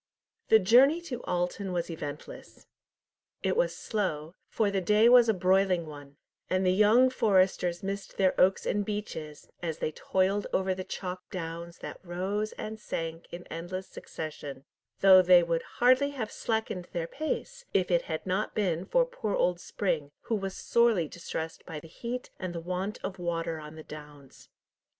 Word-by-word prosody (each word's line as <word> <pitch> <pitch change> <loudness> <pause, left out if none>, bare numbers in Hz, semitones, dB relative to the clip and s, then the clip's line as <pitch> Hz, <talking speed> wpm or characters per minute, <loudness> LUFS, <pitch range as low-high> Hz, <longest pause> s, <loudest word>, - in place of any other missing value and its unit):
The 220 - +8
journey 250 - +5
to 255 -8 -6
Alton 180 +2 -2
was 170 -1 -2
eventless. 150 -2 -8 0.8
It - - +1
was - - +1
slow, 170 -7 -2 0.2
for 210 -2 +1
the 195 -1 0
day 210 +5 +4
was 240 -1 +7
a - - +5
broiling 185 -1 +2
one, 145 -2 -11 0.3
and 185 +1 +1
the 185 - +4
young 220 +6 +5
foresters 190 -6 +2
missed 195 +1 -5
their 190 -2 +3
oaks 190 +1 +3
and 205 - 0
beeches, 195 -8 -5
as 165 -2 -3
they 155 - -2
toiled 190 +5 0
over 190 0 +1
the 185 0 -5
chalk 185 -1 -5
downs 170 -1 -6
that - - -7
rose 190 +4 -2
and 220 0 -6
sank 165 -4 -5
in 175 +1 -8
endless 185 +3 -5
succession; 145 -3 -7 0.4
though 190 -1 +9
they 180 -1 +6
would 165 -1 0 0.2
hardly 255 +3 +5
have 250 -7 -5
slackened 220 -5 -2
their 170 -2 -1
pace - - -4
if 185 -1 +1
it 170 -1 +4
had 160 -2 -5
not 190 +3 -1
been 185 -4 0
for - - +3
poor 220 - -3
old 180 -1 +1
Spring, 170 -7 -2
who 235 - -4
was 195 -2 -3
sorely 230 -8 +3
distressed 160 0 -6
by 155 - -5
the 165 - -13
heat 240 +9 -6
and 185 -2 -4
the - - -2
want 185 +4 -3
of 190 -1 -5
water 165 -2 -2
on 150 0 -10
the 155 - -9
downs. 150 -3 -12
185 Hz, 170 wpm, -29 LUFS, 165-210 Hz, 0.8 s, though